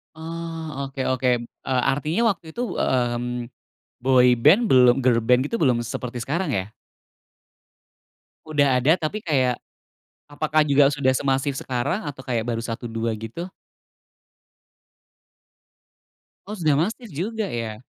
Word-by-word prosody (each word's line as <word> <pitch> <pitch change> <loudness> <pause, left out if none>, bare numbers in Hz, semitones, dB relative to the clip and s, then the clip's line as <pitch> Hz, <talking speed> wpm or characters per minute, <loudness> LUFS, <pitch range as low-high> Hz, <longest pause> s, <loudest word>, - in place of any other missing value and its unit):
Oh. 160 -3 -6
Oke 135 0 -6
oke, 130 0 0 0.4
eee, 130 -1 +1
artinya 155 +10 -1
waktu 170 - -9
itu, 240 - -3 0.2
mmm, 120 -1 -1 0.5
boy 130 -1 +5 0.2
band 170 +11 +7
belum, 125 -1 +6
girl 120 -2 +3
band 125 +3 +3
itu 230 - -3
belum 125 -6 +3
seperti 120 +1 -5
sekarang 165 +5 -2
ya? 100 -2 -2 1.7
Udah 145 -4 +2
ada, 145 +6 +5
tapi 205 +7 -3
kayak, 130 -7 +1 0.7
apakah 155 +1 0
juga 140 0 +5
sudah 130 -2 +1
semasif 135 0 0
sekarang? 130 - -2
Atau 145 -3 -6
kayak 115 -3 -1
baru 115 -1 -2
1, 115 +1 -5
2 115 0 -2
gitu? 115 +12 -7 3.0
Oh, 210 - -7
sudah 155 -6 +2
masif 220 - -2
juga 210 +7 -3
ya? 115 -3 -5
135 Hz, 125 wpm, -23 LUFS, 125-160 Hz, 3.0 s, band